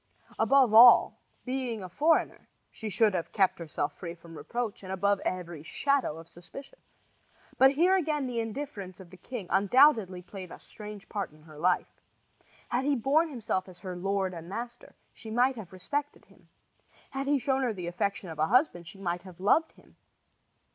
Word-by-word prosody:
Above 270 -5 +4
all, 235 +2 +8 0.2
being 250 -5 -3
a - - -6
foreigner, 310 - +1 0.2
she 220 - -6
should 210 +1 +3
have 175 -3 -3
kept 190 -3 +2
herself 150 -3 -3
free 170 -2 -7
from 170 -1 -14
reproach 215 +9 -4
and 190 -1 -8
above 200 +1 +1
every 175 -5 -4
shadow 270 - 0
of 165 0 -11
suspicion. 270 - -12 0.8
But 265 +1 +7
here 350 +6 +4
again 305 -6 0
the 245 -2 -3
indifference 220 -6 -6
of 180 -2 -13
the 185 - -13
king 225 +2 -7
undoubtedly 200 -3 +4
played 185 -1 -9
a - - -9
strange 210 -1 -10
part 200 -3 -3
in 155 0 -20
her 155 -2 -14
life. 180 +2 0 0.7
Had 245 +2 0
he 285 +1 +2
borne 285 +7 +2
himself 220 -8 -3
as 180 - -12
her 185 -2 -6
lord 190 +1 -1
and 170 0 -9
master 240 +4 -7 0.2
she 225 - -11
might 250 +4 +2
have 210 -7 -9
respected 285 +11 -4
him. - - -24 0.6
Had 270 +1 -4
he 290 0 +3
shown 265 +1 0
her 250 -3 +1
the 185 -5 -6
affection 185 +3 -2
of 160 - -8
a 155 - +2
husband 230 - +2
she 195 - -10
might 175 -2 -3
have 180 -2 -14
loved 300 - +2
him. - - -23
205 Hz, 180 wpm, -29 LUFS, 180-260 Hz, 0.8 s, all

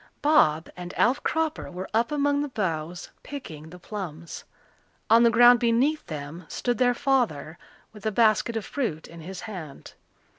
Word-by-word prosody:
Bob 165 - +4
and 180 0 -8
Alf 250 +3 +3
Cropper 320 -1 -1
were 185 +1 -6
up 230 +5 +1
among 285 -1 +1
the 290 - -2
boughs 175 -7 -3
picking 160 - -9
the 180 - -11
plums. 170 -4 -7 0.7
On 230 +1 +7
the 235 - +6
ground 240 +1 +7
beneath 250 +6 +2
them 155 +3 -7
stood 245 0 -2
their 245 -1 +3
father 235 - 0 0.3
with 210 -2 -13
a - - +1
basket 225 +1 +2
of 220 - -4
fruit 220 - -3
in 170 0 -12
his 185 +3 -8
hand. 170 -10 -9
215 Hz, 160 wpm, -26 LUFS, 170-250 Hz, 0.7 s, On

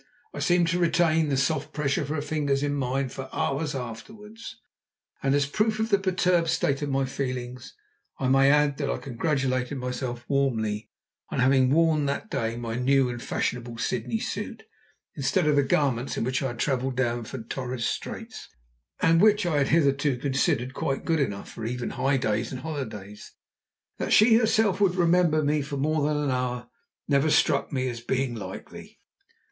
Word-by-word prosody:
I - - -6
seemed 175 -2 +3
to 175 +1 0
retain 165 -2 +2
the 135 - +1
soft 155 +4 0
pressure 140 -3 0
of 145 - -4
her 150 -1 -2
fingers 145 -3 0
in 145 0 0
mine 135 -1 -1
for 130 +1 -7
hours 145 +1 -1
afterwards, 210 - -8 0.6
and 135 0 +2
as 145 0 +2
a 140 - -11
proof 215 +2 +1
of 220 +1 0
the 200 -2 +4
perturbed 180 -3 +2
state 155 -4 0
of 145 - -2
my 135 0 +1
feelings 125 -2 -5 0.4
I 130 - -1
may 135 +1 +5
add 145 -1 +3
that 140 - -1
I - - -1
congratulated 135 0 -1
myself 125 -1 -4
warmly 110 -6 0 0.4
on - - -4
having 130 0 +4
worn 155 0 +3
that 140 +10 -3
day 115 0 -2
my 115 -1 -4
new 135 +1 +3
and 120 -1 -5
fashionable 120 -1 -3
Sydney 115 0 -2
suit, - - -5 0.5
instead 155 +5 0
of 150 -1 +3
the 145 - +5
garments 135 -2 0
in - - 0
which 130 +2 -1
I 135 - 0
had 120 -2 -6
travelled 130 0 -1
down 120 -2 0
from 120 +1 -7
Torres 125 0 -4
Straits, - - -5 0.5
and 165 +1 +5
which 210 -1 +4
I 165 -4 +1
had 140 - +2
hitherto 145 -3 +2
considered 130 -1 0
quite 135 0 -2
good 165 -1 +1
enough 100 -8 -2
for 115 - -8
even 120 +2 -3
high 135 0 +1
days 110 -2 -1
and 130 - -6
holidays. 110 -10 -7 0.7
That - - 0
she 225 +1 +7
herself 220 -4 +2
would 185 -3 +3
remember 170 -3 +3
me 150 +1 +1
for 140 0 -5
more 155 +2 +1
than 150 -1 0
an 140 - 0
hour 125 -1 -2 0.4
never 140 +1 +3
struck 145 -1 +2
me 130 -2 -1
as 120 -2 -5
being 130 +1 -1
likely. 110 -4 -9
135 Hz, 185 wpm, -26 LUFS, 125-155 Hz, 0.7 s, she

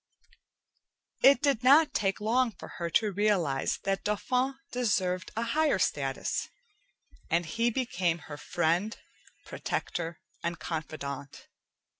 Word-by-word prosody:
It 280 +1 +6
did 275 -6 +2
not 285 +5 +6
take 195 -1 0
long 230 +2 +2
for - - -10
her 170 -1 -1
to 210 +5 +2
realize 185 -9 +1
that 195 0 -1
Dauphin 250 +6 0 0.2
deserved 190 -7 0
a 225 - 0
higher 295 +2 +2
status, 135 -6 -1 0.8
and 170 +1 +2
he 230 +9 +1
became 185 -9 0
her 145 - -7
friend, 175 +8 0 0.5
protector, 165 -1 -3 0.2
and 170 0 -2
confidante. 140 -4 -5
195 Hz, 115 wpm, -29 LUFS, 165-235 Hz, 0.8 s, It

